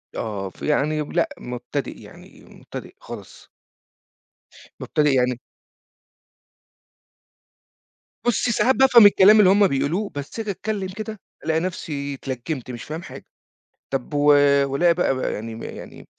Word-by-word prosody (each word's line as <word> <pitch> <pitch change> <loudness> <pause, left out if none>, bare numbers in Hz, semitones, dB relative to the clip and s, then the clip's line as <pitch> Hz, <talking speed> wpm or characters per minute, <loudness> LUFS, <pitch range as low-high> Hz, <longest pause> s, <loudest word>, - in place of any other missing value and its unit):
آه 100 -4 -4
ف - - -21
يعني 150 +1 0
لأ، 170 +3 -1
مبتدِئ 125 0 -5
يعني، - - -15
مبتدِئ - - -11
خالص. - - -11 1.3
مبتدِئ 150 -2 +1
يعني 125 -1 +1 2.9
بُصّي، 240 +1 +1
ساعات 260 +4 +2
بافهم 250 -5 +7
الكلام 205 +1 +7
اللي 190 -3 +6
هُم 200 0 +5
بيقولوه، 160 +9 -1
بس 145 +10 -6
آجي 215 -2 -2
أتكلّم 200 0 -4
كده 215 -1 -6 0.3
ألاقي 160 0 +1
نفْسي 150 -5 -4
اتلجّمت، 130 0 -5
مش 120 - -8
فاهم 160 +3 -6
حاجة، - - -11 0.6
طب 135 +2 -4
و 145 - 0 0.5
والاقي 170 +6 +2
بقى 165 -6 0
ب - - -4
يعني 115 -1 -4
يعني - - -10
155 Hz, 125 wpm, -22 LUFS, 135-200 Hz, 2.9 s, بافهم